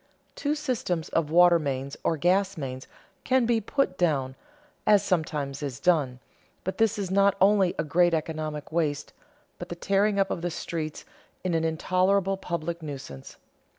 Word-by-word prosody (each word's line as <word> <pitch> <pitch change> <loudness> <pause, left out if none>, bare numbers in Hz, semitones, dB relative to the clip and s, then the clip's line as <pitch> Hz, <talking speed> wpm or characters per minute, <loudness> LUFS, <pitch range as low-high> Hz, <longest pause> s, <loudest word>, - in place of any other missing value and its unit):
Two 295 +1 -1
systems 240 - -2
of 165 -3 0
water 175 +1 +6
mains 140 -2 -3
or 165 - +1
gas 190 +4 +2
mains 130 -3 -6 0.4
can 255 -1 +2
be 230 -1 +2
put 220 -3 -1
down, 135 -7 +1 0.5
as 205 -2 +5
sometimes 150 -7 -1
is 140 -3 -4
done, 145 -6 +2 0.5
but 190 - -4
this 225 -1 +2
is 195 -3 -3
not 200 0 +4
only 195 -2 +4
a - - 0
great 175 +2 +3
economic 155 -1 -4
waste, 155 -3 -1 0.5
but - - -7
the 175 - -4
tearing 200 +3 +1
up 195 -1 +1
of - - -3
the 175 - -1
streets 160 -2 -5 0.4
is 185 -2 -1
an 165 0 +1
intolerable 185 +4 +1
public 170 -2 -4
nuisance. 135 - -8
170 Hz, 160 wpm, -27 LUFS, 150-195 Hz, 0.5 s, water